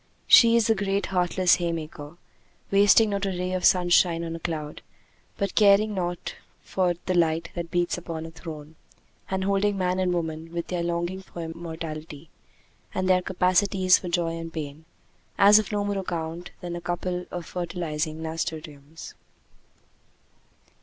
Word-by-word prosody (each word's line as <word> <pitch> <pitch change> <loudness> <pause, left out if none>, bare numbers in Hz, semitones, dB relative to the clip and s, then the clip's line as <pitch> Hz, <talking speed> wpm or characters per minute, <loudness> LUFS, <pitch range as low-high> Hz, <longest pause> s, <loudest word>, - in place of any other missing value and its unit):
She 230 -1 +7
is 230 -2 +3
the 225 - +4
great 200 -1 -1
heartless 180 0 +3
haymaker, 160 -2 -5 0.5
wasting 205 +2 +5
not 200 0 -1
a - - 0
ray 180 0 -3
of 185 -1 -2
sunshine 175 -2 +4
on 165 0 -4
a - - -6
clod, 155 -3 -5 0.6
but 200 - -2
caring 210 0 +5
naught 175 -2 -4 0.3
for 180 -2 0
the 185 - 0
light 165 -1 +1
that 170 -1 -5
beats 175 0 0
upon 165 -2 -6
a 165 - -9
throne, 160 -2 -10 0.5
and 190 0 -1
holding 200 +1 +1
man 185 0 0
and 185 -1 +1
woman, 165 -1 -3
with 170 0 -4
their 180 -1 -1
longing 175 +2 -2
for 175 -2 -8
immortality, 160 -2 -7 0.6
and 185 0 0
their 185 -1 +4
capacities 185 +1 +3
for 180 - -6
joy 170 -1 0
and 165 0 -6
pain, 155 -1 -7 0.5
as 205 +2 +7
of 215 - -4
no 205 -1 -1
more 200 -1 -1
account 170 -1 -4
than 175 -1 -5
a 175 - -6
couple 180 +1 -3
of 175 -2 -6
fertilizing 160 -3 -4
nasturtiums. 160 -2 -6
175 Hz, 155 wpm, -25 LUFS, 165-190 Hz, 0.6 s, She